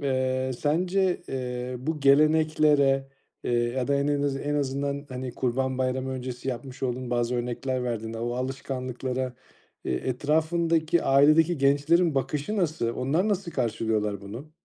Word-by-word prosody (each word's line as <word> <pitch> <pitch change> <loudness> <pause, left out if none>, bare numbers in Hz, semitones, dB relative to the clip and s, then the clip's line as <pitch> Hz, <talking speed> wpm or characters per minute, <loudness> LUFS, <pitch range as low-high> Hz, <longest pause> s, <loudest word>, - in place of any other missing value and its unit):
eee, 130 -1 0
sence, 180 +5 +1
eee, 125 -1 -4
bu 150 +4 -3
geleneklere, 145 -1 +4 0.4
eee, - - -1
ya 120 +2 0
da 140 - +3
en 140 +1 +1
en 145 -1 +1
azı 140 -1 0
en 145 0 -2
azından, 140 0 -2
hani, 130 -2 -5
kurban 130 +1 -1
bayramı 130 0 -1
öncesi 130 0 -5
yapmış 130 +2 -6
olduğun 125 -1 -2
bazı 120 0 0
örnekler 125 +1 -2
verdiğinde, 115 -2 -3
o 120 +1 -2
alışkanlıklara, 130 0 -3 0.5
eee, - - -1
etrafındaki, 160 - +1
ailedeki 155 +5 +4
gençlerin 145 +5 +3
bakışı 145 - -1
nasıl? 160 - 0
Onlar 155 +11 +1
nasıl 195 -4 -1
karşılıyorlar 110 -4 -1
bunu? 115 +10 -9
135 Hz, 140 wpm, -26 LUFS, 125-150 Hz, 0.5 s, geleneklere